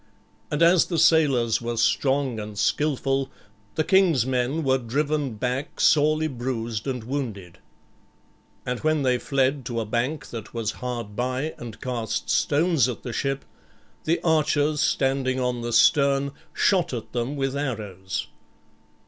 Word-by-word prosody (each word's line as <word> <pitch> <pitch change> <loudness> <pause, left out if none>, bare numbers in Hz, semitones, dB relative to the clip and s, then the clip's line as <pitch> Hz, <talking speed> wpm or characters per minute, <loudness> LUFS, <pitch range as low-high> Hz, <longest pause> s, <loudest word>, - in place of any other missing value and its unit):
And 150 +2 +1
as 170 0 +5
the 170 - -2
sailors 145 -9 +3
were 120 0 -3
strong 130 +1 +1
and 105 -1 -7
skilful, 135 0 0 0.5
the 155 - +1
king's 165 -7 +4
men 130 +4 0
were 130 -1 +2
driven 140 +1 -1
back 125 +7 -3
sorely 155 +1 +4
bruised 120 -4 -4
and 125 -4 -3
wounded. 110 -9 -5 1.1
And 125 -1 -2
when 155 -2 +1
they 125 -1 +2
fled 135 0 0
to 120 -1 -2
a 115 - -2
bank 125 +6 -2
that 115 0 -8
was 110 -2 -1
hard 120 -4 -4
by 130 +6 -2
and 115 -3 -8
cast 120 -4 -3
stones 150 -4 +2
at 120 - -6
the 120 - -5
ship, 135 +2 -2 0.6
the 165 +2 +1
archers 150 -2 +2
standing 135 -1 +1
on 125 -1 -1
the 120 0 -3
stern 140 +3 +4 0.2
shot 185 -8 +2
at 115 - -7
them 120 +4 -2
with 135 -1 -1
arrows. 105 -9 -4
130 Hz, 145 wpm, -24 LUFS, 120-150 Hz, 1.1 s, as